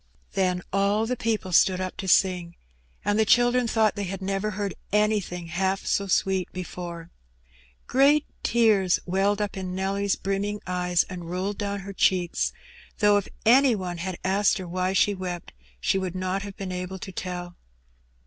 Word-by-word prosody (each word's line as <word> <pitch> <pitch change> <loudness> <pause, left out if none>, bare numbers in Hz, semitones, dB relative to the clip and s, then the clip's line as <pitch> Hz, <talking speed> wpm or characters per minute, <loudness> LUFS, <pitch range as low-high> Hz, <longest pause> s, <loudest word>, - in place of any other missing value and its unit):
Then 180 -2 0
all 200 +2 +2
the 250 +2 -1
people 220 -5 -2
stood 185 +2 +4
up 185 0 -3
to 195 - -5
sing, 180 -2 +2 0.5
and 205 +1 +2
the - - +6
children 245 +2 +4
thought 220 -2 +2
they 205 -1 -3
had 190 +1 -5
never 195 +2 -1
heard 205 -1 -3 0.2
anything 210 -4 +1
half 190 +3 -1
so 200 - 0
sweet 190 -1 +1
before. 175 -2 -7 0.7
Great 285 +3 +4 0.2
tears 215 -6 +3
welled 200 +3 +1
up 205 - -4
in 185 -1 -4
Nelly's 195 +1 0
brimming 200 +2 -2
eyes 180 -1 +1
and 175 -3 -8
rolled 190 +3 -3
down 200 -1 -2
her 200 +1 -8
cheeks; 180 -2 +1 0.5
though 205 -1 +5
if 200 - -2 0.2
any 255 +2 +6
one 180 -3 -4
had 185 0 -4
asked 195 +3 +2
her 185 -2 -6
why 185 +2 -1
she 205 +1 +3
wept, 180 - -6 0.3
she 190 - +1
would 185 -1 -4
not 185 +1 -1
have 200 -1 -8
been 190 -2 -5
able 180 +1 -4
to 190 +1 -8
tell. 175 -1 -5
190 Hz, 170 wpm, -26 LUFS, 180-205 Hz, 0.7 s, the